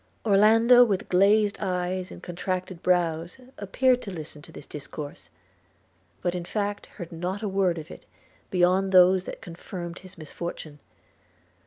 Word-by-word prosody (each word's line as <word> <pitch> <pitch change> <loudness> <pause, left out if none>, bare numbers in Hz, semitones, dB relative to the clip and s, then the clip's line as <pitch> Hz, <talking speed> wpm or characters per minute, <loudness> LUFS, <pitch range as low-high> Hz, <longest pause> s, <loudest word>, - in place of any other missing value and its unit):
Orlando 225 +4 +6
with 210 -2 -1
glazed 200 +3 +3
eyes 185 0 -2
and - - -11
contracted 180 0 -4
brows 170 0 0 0.2
appeared 250 +5 +2
to 205 - -7
listen 155 -3 -8
to 160 - -14
this 150 - -11
discourse; 145 0 -8 0.9
but, 175 - 0
in 180 -1 -4
fact, 205 +2 -3
heard 175 -4 -10
not 180 +5 -4
a - - -1
word 190 -3 +1
of 160 0 -8
it - - -13 0.4
beyond 185 +1 +2
those 185 0 +6
that - - -8
confirmed 175 -2 -8
his 185 0 -15
misfortune. 155 -1 -7
185 Hz, 145 wpm, -26 LUFS, 170-200 Hz, 0.9 s, Orlando